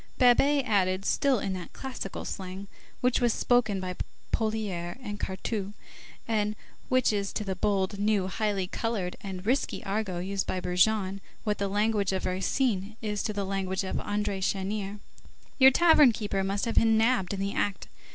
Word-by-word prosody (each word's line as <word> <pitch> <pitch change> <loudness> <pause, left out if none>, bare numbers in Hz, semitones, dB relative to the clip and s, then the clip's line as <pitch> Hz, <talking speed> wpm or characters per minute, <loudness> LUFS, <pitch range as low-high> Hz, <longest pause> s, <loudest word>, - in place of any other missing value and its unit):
Babet 275 +2 +4
added, 190 -3 +1
still 275 -2 +2
in 195 -2 -2
that 180 -2 -7
classical 255 -7 -6
slang 190 +1 -6 0.3
which 250 0 +2
was 240 -2 +3
spoken 225 -5 +2
by 185 -1 -4 0.4
Poulailler 210 -6 -2
and 205 -5 -6
Cartouche, 200 +1 -3 0.5
and 210 -2 0 0.3
which 255 -3 +3
is 200 -1 -1
to 215 - -2
the 190 -2 -3
bold, 195 0 0
new, 205 -2 +2
highly 200 0 -1
colored 195 -2 -2
and 190 -2 -6
risky 255 +5 0
argot 195 -3 -2
used 195 0 -2
by 185 - -1
Brujon 190 +2 +1 0.2
what 210 -2 -1
the 200 - 0
language 205 -1 +1
of 190 - -2
Racine 195 +2 0
is 210 -1 -1
to - - -1
the 200 -1 -2
language 190 0 -1
of 190 - -3
André 205 -1 -2
Chenier:— 195 +1 -2 0.6
"Your 265 0 +10
tavern 300 -2 +6
keeper 205 -3 -2
must 195 +3 -1
have 230 - -1
been 225 -1 +4
nabbed 220 -4 +2
in - - -6
the 200 +1 -1
act. 200 -2 -1
205 Hz, 170 wpm, -28 LUFS, 190-220 Hz, 0.6 s, Your